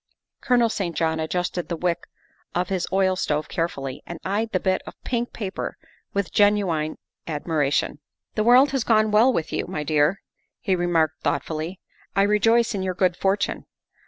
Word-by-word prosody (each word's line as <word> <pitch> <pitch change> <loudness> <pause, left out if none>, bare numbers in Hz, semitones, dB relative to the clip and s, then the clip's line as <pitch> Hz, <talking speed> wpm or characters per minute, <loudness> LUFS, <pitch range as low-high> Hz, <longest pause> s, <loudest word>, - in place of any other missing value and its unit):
Colonel 240 -3 +3
St. 185 -6 -3
John 160 -1 0
adjusted 175 +2 -2
the 170 - -1
wick 175 0 -1 0.5
of 180 0 0
his 190 -3 -1
oil 190 -1 +3
stove 150 -4 -1
carefully 140 -6 -3
and 170 -1 -7
eyed 215 +4 -1
the 185 - +1
bit 185 0 +1
of - - -8
pink 240 -1 -2
paper 200 -4 -5 0.3
with 200 -3 -2
genuine 195 -7 +2 0.3
admiration. 150 -2 0
' - - -63
' - - -61
The 215 - 0
world 255 +4 +6
has 270 -4 0
gone 215 -2 +3
well 225 +5 +5
with 165 -9 -2
you, - - -1
my 150 - -3
dear, 150 +5 +2
' - - -47
' - - -59
he 195 -6 +1
re 175 0 -1
marked 165 -2 +1
thoughtfully. 160 +4 -2 0.2
" - - -32
I 195 - +4
rejoice 225 +3 +3
in 195 - -2
your 185 -1 -2
good 180 -1 +2
fortune. 195 +2 -1
185 Hz, 190 wpm, -24 LUFS, 165-210 Hz, 0.5 s, world